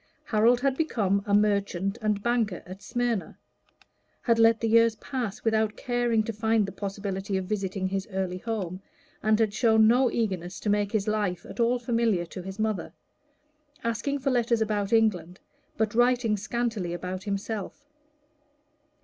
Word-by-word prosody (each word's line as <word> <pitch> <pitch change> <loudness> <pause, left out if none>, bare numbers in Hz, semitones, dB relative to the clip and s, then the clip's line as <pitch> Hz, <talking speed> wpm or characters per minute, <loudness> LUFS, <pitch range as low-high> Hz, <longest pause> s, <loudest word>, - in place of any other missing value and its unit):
Harold 235 +3 +3
had 275 -1 +1
become 210 - +1
a 200 - 0
merchant 200 -1 +1
and 210 -2 0
banker 230 -6 0
at 185 +2 -10
Smyrna; 235 -1 -2 0.9
and 230 -2 +3
let 225 0 +5
the 230 - 0
years 230 0 +4
pass 235 -3 -5
without 220 -1 +1
caring 240 -2 +1
to 225 - -4
find 220 0 +2
the 195 - -6
possibility 195 0 -3
of 190 - -3
visiting 195 -1 -2
his 195 0 -3
early 190 -1 -2
home, 195 -5 -4 0.4
and 215 0 +3
had 220 -2 +2
shown 220 -1 +4
no 250 +2 +4
eagerness 190 -6 -2
to 210 - 0
make 205 -1 +1
his 215 -3 0
life 205 -4 -1
at - - -10
all 235 +1 +3
familiar 230 -6 0
to 175 +2 -8
his 190 +2 -8
mother, 215 -2 -2 0.9
asking 230 +5 -1
for 275 0 -1
letters 240 -2 +2
about 210 -2 -1
England, 190 -6 +1 0.4
but 220 0 0
writing 240 -2 +3
scantily 215 -4 -2
about 185 +1 -5
himself. 205 +6 -4
215 Hz, 160 wpm, -27 LUFS, 195-230 Hz, 0.9 s, let